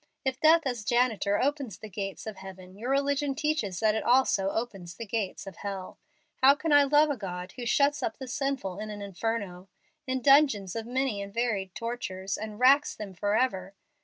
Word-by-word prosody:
If 265 0 -1
death 320 +1 +5
as 245 -5 -2
janitor 225 -3 +1
opens 275 - -1
the 215 - -9
gates 195 -1 -5
of 215 -3 -6
heaven, 190 -1 -11
your 230 +5 -5
religion 280 0 +1
teaches 300 - -1
that 215 -1 +3
it 220 - -2
also 240 -6 +3
opens 195 -6 -4
the 230 - -7
gates 210 -2 -3
of 195 -2 -9
hell. 195 -2 -6 0.4
How 270 +2 +7
can 310 +1 -1
I 290 -1 +7
love 295 +2 +4
a - - -1
God 180 -2 -6
who 245 +1 -6
shuts 285 +4 +2
up 345 - -2
the 265 - -7
sinful 250 -8 -3
in 215 0 -5
an 205 -1 -6
inferno 195 -2 -4 0.4
in 260 -1 -2
dungeons 275 -10 +4
of 225 0 -4
many 255 -4 -1
and 200 0 -7
varied 205 -5 -2
tortures, 200 -5 -4
and 215 0 -7
racks 275 +3 +5
them 205 -3 -7
forever? 200 -1 0
225 Hz, 190 wpm, -28 LUFS, 195-270 Hz, 0.4 s, How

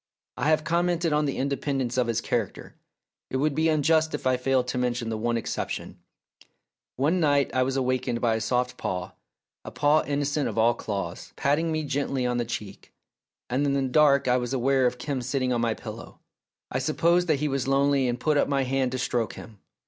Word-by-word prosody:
I - - 0
have 155 -1 +3
commented 170 0 +1
on 150 0 +2
the 140 - -2
independence 135 -2 -1
of 125 -2 +1
his 115 0 0
character; 115 -5 -3 0.6
it 130 - -1
would 150 +2 +1
be 160 +3 +2
unjust 155 +1 +2
if - - -7
I 130 0 +3
failed 125 0 +1
to 125 - -1
mention 120 -2 -1
the 110 - -2
one 120 +1 0
exception. 115 - -4 1.0
One 155 +8 +1
night 145 -4 +2
I 130 - +2
was 135 +1 0
awakened 130 -2 0
by 115 -1 +2
a 110 - -1
soft 125 +2 -1
paw, 90 0 -3 0.5
a - - -7
paw 150 +2 +3
innocent 145 0 0
of - - -7
all 115 +2 +4
claws, 105 -3 -5
patting 155 +4 +1
me 155 0 -1
gently 140 -2 -1
on 125 0 0
the 120 - 0
cheek, 105 -4 -7 0.6
and 130 +3 0
in 140 -1 +1
the 140 -1 +1
dark 140 +1 +4
I 125 0 +4
was 125 0 -3
aware 130 0 +3
of 125 - -2
Kim 135 +1 -3
sitting 130 0 -1
on 120 - 0
my 115 -2 0
pillow. - - -9 0.5
I 130 - 0
supposed 170 +5 +2
that 155 -4 +2
he 150 - 0
was 135 -2 -1
lonely 140 -1 +2
and 120 +1 -2
put 155 -2 +1
up - - +3
my 140 -1 +1
hand 130 -1 0
to - - -1
stroke 120 -3 -1
him. 110 -3 -12
135 Hz, 210 wpm, -26 LUFS, 125-145 Hz, 1.0 s, all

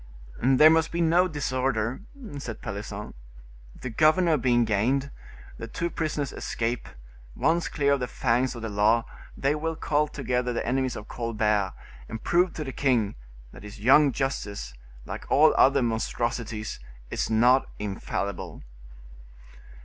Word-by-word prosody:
"There 135 +5 +6
must 160 0 +2
be 170 - -3
no 170 +2 +4
disorder," 130 - -1 0.4
said 120 -5 -6
Pelisson. 105 0 -6 0.7
"The 130 - -5
governor 155 +6 +4
being 120 -3 +2
gained, 125 +7 0 0.5
the 115 - -5
two 170 +9 -3
prisoners 150 -3 -2
escape; 115 +1 -3 0.5
once 170 +1 +1
clear 140 -2 +1
of 140 - +1
the 125 - -2
fangs 125 0 0
of 115 - -8
the 115 - -3
law, 105 +3 +2 0.3
they 140 +1 +1
will 160 +2 -2
call 150 -1 +1
together 125 -4 -2
the - - -2
enemies 130 0 0
of 105 - -8
Colbert, 105 -4 0 0.4
and 110 - -6
prove 175 0 +2
to 155 - -4
the 135 - -5
king 120 -7 +1 0.4
that - - -13
his 105 0 -10
young 135 +6 +5
justice, 100 - -3 0.3
like - - -7
all - - +5
other 140 -1 +5
monstrosities, 115 -1 -2 0.3
is - - -1
not 120 +4 +4
infallible." 100 -1 -4
125 Hz, 140 wpm, -26 LUFS, 110-145 Hz, 0.7 s, There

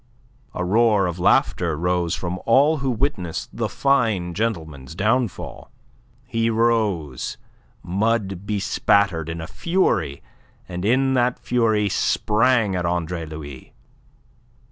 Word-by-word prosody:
A 90 - -2
roar 105 0 +3
of 90 0 -3
laughter 85 -2 +2
rose 90 0 0
from 90 +1 -4
all 140 +7 +5
who 135 -2 -2
witnessed 115 - -2
the - - -1
fine 110 -11 +1
gentleman's 80 - -4
downfall. 110 +3 -1 0.6
He 115 0 0
rose, 110 - 0 0.5
mud 100 0 -1
bespattered, 100 -4 +1
in 85 0 -4
a 80 - -5
fury, 90 - 0 0.4
and 90 0 -5
in 130 +5 +2
that 125 -1 +2
fury 110 -4 +1
sprang 110 +1 +2
at 90 - -1
Andre 85 -1 -2
Louis. 75 -4 -9
100 Hz, 115 wpm, -22 LUFS, 85-115 Hz, 0.6 s, all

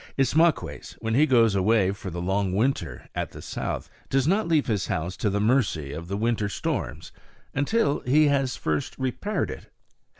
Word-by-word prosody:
Ismaques, 155 +5 +1
when 115 0 -2
he 150 +6 +4
goes 115 -5 +4
away 100 0 +3
for 100 -1 -6
the 85 0 -5
long 95 0 0
winter 130 +7 -1
at - - -3
the - - -9
South, - - -4 0.2
does 135 +1 +2
not 200 +4 +2
leave 160 -3 +3
his 105 -5 -1
house 85 +3 -2
to 105 - 0
the 100 +1 0
mercy 105 - +1
of 85 +3 -6
the 100 +2 -2
winter 110 -2 0
storms - - -3 0.4
until 145 +3 +1
he 150 +5 +4
has 135 -4 +1
first 75 - -2
repaired 130 - -2
it. - - -10
115 Hz, 175 wpm, -26 LUFS, 100-140 Hz, 0.4 s, he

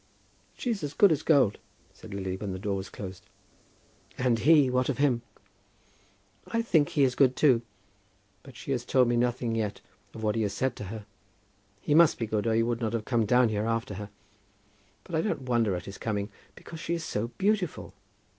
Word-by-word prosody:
"She's 230 -6 -2
as 145 0 -4
good 200 -3 +6
as 155 -2 +1
gold," 135 -11 +3 0.3
said - - -13
Lily, 95 -1 -3
when 95 0 -5
the - - -4
door 100 +1 -2
was 95 0 -5
closed. 95 -2 -8 0.9
"And 125 -3 +1
he; 150 +1 +5
what 125 +1 +1
of 135 - -1
him?" 130 -4 +2 1.3
"I 230 0 -1
think 160 -10 +3
he 145 - +2
is 130 -2 +3
good, 130 -1 +3
too; 130 -6 +4 0.8
but 135 -3 -14
she 140 - -6
has 125 -3 -1
told 125 0 +3
me 120 - +1
nothing 120 -1 0
yet 110 -2 -2 0.4
of 110 - -7
what 105 -1 +1
he 115 - -1
has 100 -2 -1
said 130 +4 -1
to 105 - -6
her. 105 +2 -7 0.8
He 145 - 0
must 165 0 +6
be 115 - -2
good, 110 0 -1
or 110 - +2
he 115 - +3
would 120 0 -1
not 115 -1 -1
have 115 -2 -2
come 115 -4 +1
down 125 +1 +4
here 105 0 -1
after 115 -1 -1
her. 100 +2 -7 0.9
But 175 - -13
I 160 - +2
don't 210 -9 -2
wonder 120 -6 +1
at 90 - -6
his 100 - -9
coming, 105 -2 -2 0.2
because 165 - -10
she 170 +2 -2
is 165 - -4
so 115 -7 -2
beautiful! 195 -3 -1
120 Hz, 205 wpm, -28 LUFS, 105-140 Hz, 1.3 s, good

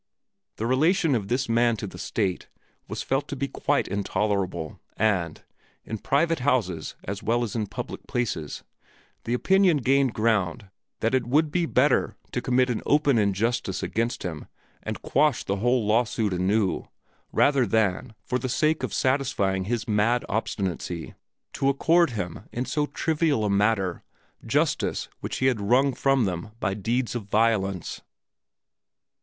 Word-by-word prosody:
The 110 - -3
relation 155 +6 +3
of 105 -5 -1
this 125 +4 0
man 115 0 +2
to 105 - -5
the 95 - -9
state 95 -5 -2 0.4
was - - -4
felt 135 +2 -1
to - - -4
be 140 +1 -2
quite - - 0
intolerable 100 -4 -2 0.2
and, 95 -7 0 0.4
in 110 - -5
private 165 +7 +1
houses 115 - 0
as 100 +1 -5
well 120 +2 +1
as 115 - -4
in 110 -2 -1
public - - -7
places, 95 -11 -3 0.6
the 120 - 0
opinion 190 +3 +4
gained 135 -1 +2
ground 105 -2 0 0.3
that 115 - +1
it 130 -3 +1
would 150 +4 +2
be 175 0 +1
better - - +2 0.2
to - - -2
commit 125 0 +2
an 115 - -2
open 145 -4 +3
injustice 100 -1 0
against 115 +2 -1
him 80 -4 -5 0.3
and - - -5
quash 150 +1 +2
the 100 - -1
whole 120 +2 +2
lawsuit 110 -1 +1
anew, 95 +2 0 0.4
rather 135 -4 +3
than, 110 +1 0
for 125 - -1
the - - -6
mere - - -1
sake 155 +5 +1
of - - -3
satisfying 130 -9 +1
his 115 +1 -2
mad 110 +3 +2
obstinacy, 95 -5 -3 0.4
to 135 - +1
accord 165 +5 +3
him 100 -3 -5
in 125 +2 -2
so 150 +1 -1
trivial 155 -9 0
a 105 - +1
matter 100 -3 +1 0.5
justice - - 0
which - - -4
he 130 - 0
had 125 -5 +2
wrung 130 +7 +3
from 135 -3 +2
them 90 +1 -3
by 95 - 0
deeds 115 +5 -1
of 120 -4 -4
violence. 100 -4 0
115 Hz, 155 wpm, -25 LUFS, 100-130 Hz, 0.6 s, opinion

